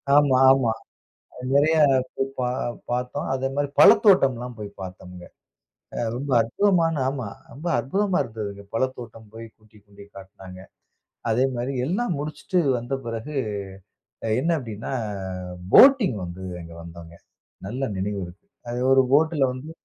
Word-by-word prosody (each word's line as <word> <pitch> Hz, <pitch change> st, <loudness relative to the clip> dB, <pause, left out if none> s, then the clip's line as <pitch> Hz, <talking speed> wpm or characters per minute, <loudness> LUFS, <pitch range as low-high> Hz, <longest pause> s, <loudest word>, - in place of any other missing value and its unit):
ஆமா, 145 Hz, -3 st, +5 dB
ஆமா. 130 Hz, -4 st, +2 dB, 0.8 s
நெறையா 155 Hz, +3 st, +4 dB, 0.6 s
பா 125 Hz, -1 st, 0 dB, 0.4 s
பார்த்தோம். 125 Hz, +1 st, -2 dB
அதே 135 Hz, 0 st, -1 dB
மாரி 145 Hz, 0 st, -1 dB
பழத்தோட்டம்லாம் 130 Hz, -, +5 dB
போய் 105 Hz, -1 st, -6 dB
பார்த்தோம்ங்க. 90 Hz, -1 st, -9 dB, 0.9 s
ரொம்ப 140 Hz, +3 st, -5 dB
அற்புதமான 165 Hz, -, +2 dB
ஆமா. 130 Hz, -5 st, -4 dB, 0.2 s
ரொம்ப 150 Hz, +8 st, -6 dB
அற்புதமா 190 Hz, -, 0 dB
இருந்துதுங்க. 105 Hz, -4 st, -7 dB
பழத்தோட்டம் 115 Hz, -3 st, -4 dB
போய் 115 Hz, 0 st, -8 dB
கூட்டிக் 110 Hz, -1 st, -23 dB
கொண்டுபோய் 100 Hz, 0 st, -17 dB
காட்னாங்க. 95 Hz, -1 st, -12 dB, 0.7 s
அதே 120 Hz, +4 st, +2 dB
மாரி 125 Hz, +3 st, -3 dB
எல்லாம் 185 Hz, -, -1 dB
முடிச்சுட்டு 150 Hz, +5 st, -3 dB, 0.2 s
வந்த 120 Hz, +3 st, -4 dB
பிறகு 115 Hz, +6 st, -5 dB, 0.9 s
அ -, -, -1 dB
என்ன 165 Hz, -, 0 dB
அப்டின்னா, 115 Hz, 0 st, -7 dB, 0.8 s
போட்டிங் 255 Hz, -, +7 dB
வந்தது 90 Hz, +2 st, -7 dB
அங்க 85 Hz, 0 st, -11 dB
வந்தோங்க. 85 Hz, 0 st, -11 dB, 0.5 s
நல்ல 125 Hz, +6 st, -5 dB
நினைவு 100 Hz, +1 st, -2 dB
இருக்கு. 90 Hz, +3 st, -15 dB, 0.2 s
அது 120 Hz, +1 st, -3 dB
ஒரு 135 Hz, 0 st, +6 dB
போட்டில 155 Hz, +1 st, +3 dB
வந்து 130 Hz, +5 st, -8 dB
125 Hz, 125 wpm, -24 LUFS, 105-145 Hz, 0.9 s, போட்டிங்